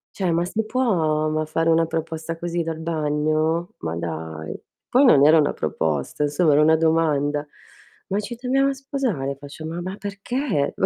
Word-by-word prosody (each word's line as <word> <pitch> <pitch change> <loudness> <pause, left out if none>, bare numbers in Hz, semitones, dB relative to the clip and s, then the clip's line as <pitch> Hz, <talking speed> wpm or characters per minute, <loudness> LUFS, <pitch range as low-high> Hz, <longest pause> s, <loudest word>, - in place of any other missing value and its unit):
Cioè 185 -4 0
ma 170 +1 +1
si 220 +5 -2
può, 170 -11 +1
ma 155 0 0
fare 165 +1 0
una 165 0 +3
proposta 165 0 -4
così 170 0 -2
dal 165 -1 -3
bagno? 155 +1 0
Ma 80 0 -3
dai! 80 -2 -5 0.3
Poi 270 +3 +4
non 145 - +7
era 160 +1 +7
una 145 - +2
proposta, 75 - -2
insomma, 150 +2 +2
era 150 - +5
una 160 +1 +5
domanda: 150 -3 +1 0.6
"Ma 200 +2 0
ci 235 +3 -5
dobbiamo 270 +2 +2
sposare?" 245 - -2
Faccio: 145 +2 -9
"Ma 170 +2 -4
ma 185 +2 -5
perché?" 200 - -2
Ma - - +1
160 Hz, 170 wpm, -23 LUFS, 150-185 Hz, 0.6 s, non